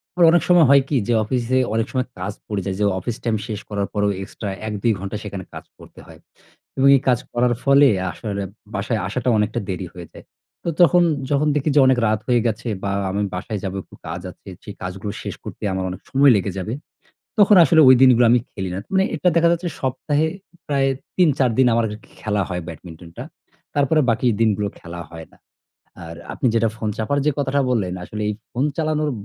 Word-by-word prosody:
আবার 175 -1 +5
অনেক 175 - +4
সময় 175 -3 +6
হয় 140 0 +7
কি? 150 - 0
যে 120 - +2
অফিসে 125 +3 -1 0.2
অনেক 115 0 +1
সময় 130 -1 -1
কাজ 100 +3 -4
পড়ে 105 -2 -2
যায়, 95 -1 -2
যে - - +1 0.2
অফিস 115 +5 -4
টাইম 115 -2 0
শেষ 105 -3 -4
করার 100 -1 -2
পরেও 105 -1 +1
এক্সট্রা 100 +1 -7 0.2
১ 110 - -3
২ 115 - +3
ঘণ্টা 100 +2 -5
সেখানে 100 -2 -6
কাজ - - -9
করতে - - -16
হয় - - -15 0.6
এবং 135 +1 +4
এই - - -4
কাজ 125 -2 +3
করার 120 0 +2
ফলে 140 +1 +6 0.2
আসলে 100 -1 -5 0.3
বাসায় 110 +3 -1
আসাটা 125 +5 -2
অনেকটা 105 +1 0
দেরি 95 -1 -4
হয়ে 90 -2 -9
যায়। - - -13 0.4
তো - - -1
তখন 175 0 +6 0.3
যখন 145 +2 +2
দেখি 150 +1 0
যে, - - +6
অনেক 130 -1 +4
রাত 110 0 +1
হয়ে 120 -2 +3
গেছে 115 +2 -3 0.2
বা 100 - -1 0.2
আমি 100 +2 -1
বাসায় 100 +3 -4
যাব 95 -1 -3
একটু - - -17
কাজ 85 +2 -5
আছে, - - -23 0.2
সেই 105 - -8
কাজগুলো 95 +3 -5
শেষ - - -5
করতে - - -9
আমার 95 0 -2
অনেক 90 - -7
সময় 140 0 +5
লেগে 100 0 -2
যাবে, 95 +4 -3 0.7
তখন 205 -1 +6
আসলে 160 +2 +5
ঐ - - +9
দিনগুলো 125 -2 +6
আমি 120 0 +4
খেলি 95 -2 -5
না। - - -3
মানে 190 0 +3
এটা 160 +3 +1
দেখা 170 0 +5
যাচ্ছে 175 +1 -2
সপ্তাহে 145 +3 0 0.4
প্রায় 140 -2 +2 0.3
৩ 180 -3 +5
৪ 130 -3 +3
দিন 130 - +5
আমার 115 0 +2 0.4
খেলা 105 -2 0
হয় 90 -1 -4
ব্যাডমিন্টনটা। 85 +1 -10 0.5
তারপরে 145 +2 +3
বাকি 115 +3 0
দিনগুলো 105 -2 +1
খেলা 85 0 -8
হয় 80 -1 -10
না। - - -22 0.7
আর 85 0 -9 0.2
আপনি - - -2
যেটা 115 0 +2
ফোন 110 -1 -3
চাপার 115 +6 -1
যে - - +5
কথাটা 140 0 +1
বললেন, 100 -7 0
আসলে 105 +3 -6
এই 105 - -1 0.2
ফোন 125 +3 0
চালানোর 155 -1 0
115 Hz, 205 wpm, -21 LUFS, 100-140 Hz, 0.7 s, ঐ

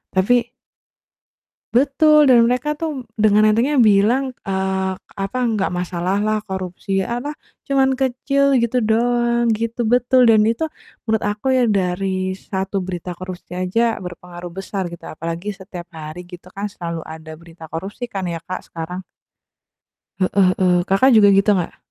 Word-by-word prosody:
Tapi 240 +5 +2 1.2
Betul! 290 +2 +5
Dan, 235 -2 +6
mereka 260 +5 -1
tuh 305 -5 -3 0.2
dengan 215 0 +4
entengnya 240 +7 +2
bilang, 225 +6 +3 0.2
eee, 190 0 -1 0.3
apa, 195 +6 -3
"Nggak 210 -3 0
masalah 180 +2 -1
lah 215 0 +1
korupsi, 190 0 -3
e - - -4
apa, 290 +4 -5 0.3
cuman 265 -2 +2
kecil 275 +2 +1
gitu 235 +2 +1
doang," 235 +1 +2
gitu 230 +2 -1
betul, 245 +1 +4
dan 215 -1 +5
itu 230 +6 0 0.4
menurut 220 -2 0
aku 210 +4 -3
ya 255 -2 +3
dari 185 -1 -1
satu 190 0 -3
berita 180 -1 -5
korupsi 185 -2 -8
aja 225 +6 +1
berpengaruh 175 -1 -9
besar 195 +1 -4
gitu, 170 -1 -9
apalagi 165 +5 -5
setiap 180 -2 -9
hari 160 +2 -8
gitu 180 0 -11
kan, 205 +1 -4
selalu 170 -4 -5
ada 160 0 -9
berita 165 0 -14
korupsi 195 +9 -5
kan 195 -6 -5
ya 165 - -3
Kak, 185 - -5
sekarang. 170 +2 -5 1.2
Heeh 185 0 +3
heeh, 180 -1 +3
Kakak 255 +8 +4
juga 205 -1 +7
gitu 200 +1 +4
nggak? 180 -4 -1
200 Hz, 150 wpm, -20 LUFS, 185-240 Hz, 1.2 s, juga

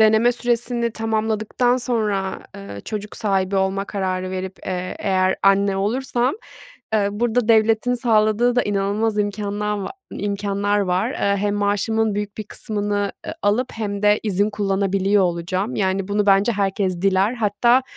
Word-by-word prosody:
Deneme 220 +2 +5
süresini 240 0 0
tamamladıktan 220 +2 0
sonra, 215 -6 -1 0.2
eee, 100 0 -8
çocuk 210 -1 -5
sahibi 195 -2 0
olma 190 +1 0
kararı 185 -2 -3
verip, 190 0 -5
eee, 185 -1 -3
eğer 185 -1 +1
anne 195 0 +3
olursam, 245 - 0 0.6
eee, 205 -2 +2
burada 235 +1 0
devletin 225 +2 +3
sağladığı 230 0 +2
da 245 - +4
inanılmaz 205 +2 0
imkânla 205 0 -1
va - - -4 0.2
imkânlar 205 0 -1
var. 190 +5 0
Hem 200 +1 0
maaşımın 205 +2 0
büyük 205 0 -4
bir 215 - -2
kısmını, 205 -1 -2
ııı, - - -4
alıp 230 +5 +1
hem 205 -2 -4 0.2
izin 205 0 +1
kullanabiliyor 195 -1 +1
olacağım. 185 +5 -1
Yani, 190 0 0
bunu 205 0 0
bence 200 +4 +4
herkes 195 -3 -1
diler. 195 +4 +2
Hatta 235 +3 +3
205 Hz, 135 wpm, -21 LUFS, 195-220 Hz, 0.6 s, Deneme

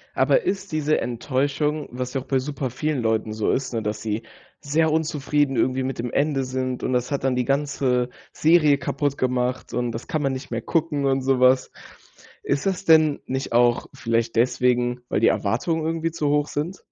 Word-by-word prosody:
Aber - - +3
ist 195 - -2
diese 155 -1 +1
Enttäuschung, 140 +5 -1
was 125 +1 -5
ja 135 - -1
auch - - -13
bei 135 - +1
super 135 -1 -3
vielen 145 +2 -2
Leuten 110 -1 0
so 110 -1 0
ist, 130 -1 -2
ne, 115 - -1
dass 105 0 -3
sie 110 0 -3 0.4
sehr 160 +3 +1
unzufrieden 150 -3 0
irgendwie 130 0 +1
mit 130 -1 -4
dem 120 +1 -2
Ende 140 -2 +1
sind 130 -1 -3
und - - -1
das 125 +1 0
hat 140 - -2
dann 130 -1 +2
die 125 - +1
ganze 135 -3 0 0.2
Serie 155 -3 +4
kaputt 145 0 -2
gemacht 125 0 -1
und 120 -1 -1
das 115 +1 -7
kann 155 - -1
man 135 -2 +1
nicht 130 0 -6
mehr 115 0 -2
gucken 155 0 0
und 135 0 +2
sowas. 130 0 +3 0.7
Ist 140 - -1
das 195 0 -1
denn 155 -3 +5
nicht 130 +1 -3
auch 120 0 +3
vielleicht 115 0 -1
deswegen, 125 0 +2
weil - - +1
die 115 - +4
Erwartungen 155 - 0
irgendwie 165 0 -1
zu 155 -3 -1
hoch 145 0 +2
sind? 165 +7 -3
135 Hz, 195 wpm, -23 LUFS, 125-150 Hz, 0.7 s, denn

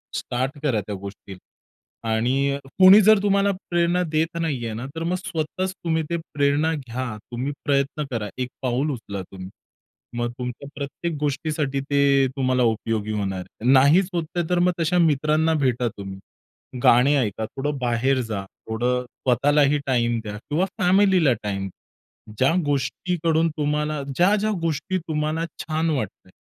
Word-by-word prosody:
Start 130 +4 -3
करा 125 -8 +1
त्या 100 +1 -6
गोष्टीला. 100 0 -9 0.7
आणि 135 +5 +1 0.2
कोणी 190 +2 +9
जर 215 0 +6
तुम्हाला 200 0 +3 0.2
प्रेरणा 175 +1 +2
देत 165 +2 0
नाहीये 125 -9 -2
ना, 120 +4 -5
तर 165 - -3
मग 175 +2 0
स्वतःच 185 +1 -3
तुम्ही 160 -3 -1
ते 170 - 0 0.2
प्रेरणा 145 +2 +2
घ्या, 130 -4 -4 0.2
तुम्ही 125 +4 -2
प्रयत्न 140 +1 +1
करा, 110 -3 -3
एक 125 -1 -2
पाऊल 130 +4 0
उचला 100 -6 -5
तुम्ही. 95 -1 -8 0.7
मग 120 0 -1
तुमच्या 125 +2 -5
प्रत्येक 145 +4 -4
गोष्टीसाठी 145 -1 -1
ते 140 -1 +3
तुम्हाला 130 -1 +2
उपयोगी 110 -2 0
होणार 100 -3 -2
आहे. 115 +7 -2
नाहीच 150 +8 +5
होतंय 170 0 -2
तर 180 -1 +2
मग 180 +1 +4
तशा 170 +2 +1
मित्रांना 155 0 +2
भेटा 125 -1 +1
तुम्ही. 95 -1 -7 0.6
गाणी 125 +5 +5
ऐका, 110 -3 -1
थोडं 145 +5 -3
बाहेर 125 +2 +1
जा, 110 -4 -3 0.3
थोडं 125 +3 0
स्वतःलाही 140 +4 +2
टाईम 120 -2 +1
द्या 105 -1 -6
किंवा 150 - -1
फॅमिलीला 185 -6 +4
टाईम. 95 -2 -3 0.7
ज्या 135 +5 +3
गोष्टीकडून 160 +4 0
तुम्हाला 150 0 -1
ज्या 180 +7 +4
ज्या 215 +1 0
गोष्टी 165 +3 -1
तुम्हाला 155 0 -2 0.2
छान 160 +1 -1
वाटतात, 105 -9 -4
140 Hz, 145 wpm, -23 LUFS, 120-160 Hz, 0.7 s, कोणी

